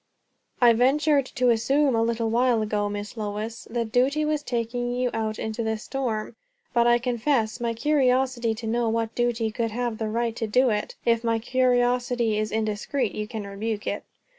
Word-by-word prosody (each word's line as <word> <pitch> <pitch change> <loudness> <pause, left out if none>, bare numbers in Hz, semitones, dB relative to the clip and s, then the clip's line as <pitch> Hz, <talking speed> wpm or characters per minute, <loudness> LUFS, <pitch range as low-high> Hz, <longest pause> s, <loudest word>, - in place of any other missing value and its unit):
"I 240 -2 +6
ventured 275 +3 +3
to 250 -2 +3
assume, 270 +5 +2
a 225 - +2
little 230 -1 0
while 240 -1 +3
ago, 210 -1 -1
Miss 205 +2 -5
Lois, 215 +2 -4
that 230 -1 -2
duty 270 +5 +2
was 300 -1 0
taking 245 -1 -2
you 250 0 0
out 220 -1 -2
into 220 +1 -3
this 220 -1 -2
storm; 235 -5 -3 0.4
but 235 -1 +4
I 240 0 +5
confess 240 -1 0
my 235 -1 -1
curiosity 255 -4 +1
to 225 +1 -7
know 230 +1 0
what 225 0 -1
duty 235 -2 0
could 230 +1 -1
have 235 0 -3
the 220 -1 -2
right 230 +1 -1
to 225 - -2
do 250 +3 +3
it. 210 0 -2
If 230 0 +2
my 230 -1 +1
curiosity 245 -2 +1
is 215 0 -2
indiscreet, 220 +2 -1
you 210 0 -4
can 215 -2 -5
rebuke 205 +2 -4
it." - - -3
235 Hz, 185 wpm, -25 LUFS, 220-250 Hz, 0.4 s, I